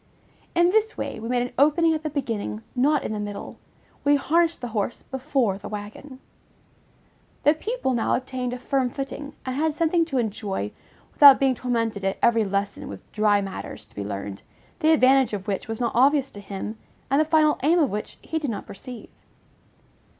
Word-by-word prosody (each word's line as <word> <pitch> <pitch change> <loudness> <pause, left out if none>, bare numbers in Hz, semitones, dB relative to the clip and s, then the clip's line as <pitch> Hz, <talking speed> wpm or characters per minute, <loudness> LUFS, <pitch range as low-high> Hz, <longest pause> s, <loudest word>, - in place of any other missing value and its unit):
In 345 +1 +4
this 440 +1 +1
way, - - -4
we 225 +1 -6
made 245 -1 +1
an 245 - -6
opening 320 +3 +4
at 310 - -2
the 310 - -3
beginning, 220 - -3
not 285 +3 +2
in - - -3
the 210 - -3
middle: 205 -1 -6 0.4
we 290 0 +5
harnessed 330 +4 +2
the 245 - -5
horse 215 +1 -3
before 260 -7 -1
the - - -8
wagon. 215 +6 -8 1.2
The 295 - +6
pupil 430 - -2
now 235 - +1
obtained 255 -1 -3
a 250 - -4
firm 260 0 0
footing, 275 +2 -6
and 255 -1 -3
had 310 +1 0
something 335 +1 +2
to 285 -5 -3
enjoy, 205 - -2 0.4
without 280 -2 +9
being 270 -1 +3
tormented 230 -5 -2
at 195 0 0
every 230 -1 +4
lesson 200 0 -2
with 100 - -10
dry 210 -1 +3
matters 195 -1 -7
to - - -26
be 100 - -4
learned, 100 -1 -5 0.4
the 315 -2 +3
advantage 265 -5 +4
of 195 -2 -4
which 200 -2 -2
was 225 0 -4
not 235 -2 0
obvious 275 +2 +3
to 205 - -10
him, 200 +2 -6 0.3
and 280 +2 +4
the - - +2
final 310 -1 +3
aim 315 +6 +4
of 300 -6 +2
which 210 +1 -5
he 320 - -2
did 290 -4 -3
not 210 -3 -4
perceive. 240 +3 -10
255 Hz, 190 wpm, -24 LUFS, 210-295 Hz, 1.2 s, without